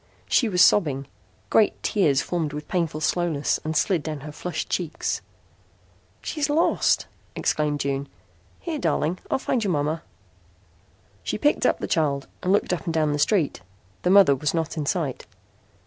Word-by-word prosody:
She 235 - +3
was 180 -3 +5
sobbing. 140 -8 +3 0.5
Great 220 - +3
tears 155 -10 +2
formed 160 -4 -2
with 150 0 -6
painful 165 -4 -1
slowness 160 -3 0
and 155 0 -1
slid 180 -2 +2
down 155 -2 -5
her 150 +2 -7
flushed 160 +1 -4
cheeks. 175 -4 -2 1.0
"She's 295 -1 -2
lost," 315 +3 +2 0.3
exclaimed 150 -2 0
June. 140 0 -2 0.5
"Here, 320 -3 -4
darling, 165 - 0
I'll - - +2
find 255 -3 -1
your 195 -4 0
mama." 150 +2 -1 1.2
She - - -3
picked - - +2
up - - +2
the - - -4
child 140 -4 0 0.2
and 185 - 0
looked 200 -2 +2
up 175 - -4
and 165 - -2
down 155 -2 +2
the 145 - -2
street. 160 - +1 0.4
The - - 0
mother 190 -7 +7
was 150 +5 -1
not 165 0 -2
in 150 -3 -3
sight. 150 -7 -2
160 Hz, 165 wpm, -24 LUFS, 150-180 Hz, 1.2 s, mother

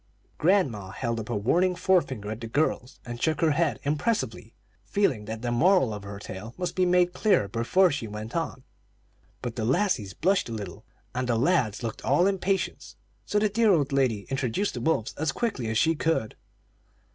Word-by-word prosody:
Grandma 145 - +2
held 115 +3 -3
up 110 - -6
a 120 - -1
warning 175 - +2
forefinger 130 - +1
at 110 +2 -6
the 115 - -5
girls, 135 0 -1
and 120 -1 -7
shook 160 -1 +1
her 165 -2 +3
head 160 +1 +1
impressively, 155 +11 -1 0.3
feeling 135 - 0
that 110 +2 -6
the 120 - -1
moral 160 - +3
of 105 - -6
her 100 0 -8
tale 100 +3 -8
must 180 -1 -3
be 185 -1 +2
made 180 0 +3
clear 190 - +2
before 120 - +3
she 140 -6 -3
went 105 +2 -7
on. 165 -6 -3 0.8
But 120 0 -4
the 110 - -1
lassies 120 - 0
blushed 185 -4 +1
a - - -4
little, 100 -5 -7 0.3
and 125 0 -2
the 115 - +2
lads 125 - +1
looked 115 - -5
all 145 +7 +3
impatience, 195 0 -1 0.3
so 210 - 0
the 210 +1 +3
dear 215 +1 +3
old 145 -6 +2
lady 130 -7 +1
introduced 135 - -1
the 120 - -5
wolves 120 -5 0
as 160 -1 +1
quickly 170 - -2
as 110 0 0
she 160 +8 +3
could. 160 -8 -1
135 Hz, 190 wpm, -27 LUFS, 115-180 Hz, 0.8 s, her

